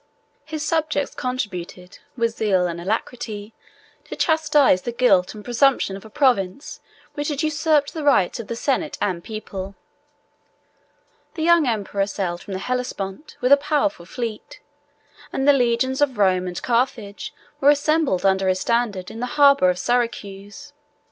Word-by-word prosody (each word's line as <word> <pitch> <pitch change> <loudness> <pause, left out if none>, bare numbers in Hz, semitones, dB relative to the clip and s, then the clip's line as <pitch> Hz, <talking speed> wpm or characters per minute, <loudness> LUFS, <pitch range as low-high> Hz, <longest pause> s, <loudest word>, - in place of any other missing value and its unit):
His 310 -1 -4
subjects 310 -3 0
contributed, 185 -8 -5 0.2
with 230 -1 +1
zeal 190 -4 +1
and 170 -1 -4
alacrity, 215 +1 -4 0.5
to - - -7
chastise 300 - +3
the 240 - -4
guilt 215 -6 +2
and 210 - -10
presumption 245 -4 +2
of 195 - -10
a 220 - -12
province 245 -2 0 0.3
which 290 0 -3
had 295 -1 -2
usurped 310 -1 +1
the 315 - -5
rights 235 -12 +3
of 230 - -7
the 235 - -4
senate 280 +5 -1
and 180 -4 -2
people; 200 -3 -7 1.6
the 320 - -3
young 340 -3 +4
emperor 200 -3 -1
sailed 175 -4 -3
from 200 - -8
the 190 - -3
Hellespont 250 -1 -4
with 250 +1 +1
a 280 - +9
powerful 295 - -1
fleet; 230 -2 -6 0.7
and 270 - -1
the 285 - +8
legions 260 +1 +1
of 265 -5 +1
Rome 185 -2 +2
and 180 -1 -4
Carthage 235 -4 -1 0.3
were 280 - +5
assembled 295 - +2
under 190 0 +2
his 185 0 +1
standard 220 -6 -1
in 225 - -8
the 250 - -2
harbor 280 -9 +6
of 180 - 0
Syracuse. 210 +1 -3
235 Hz, 155 wpm, -22 LUFS, 195-285 Hz, 1.6 s, a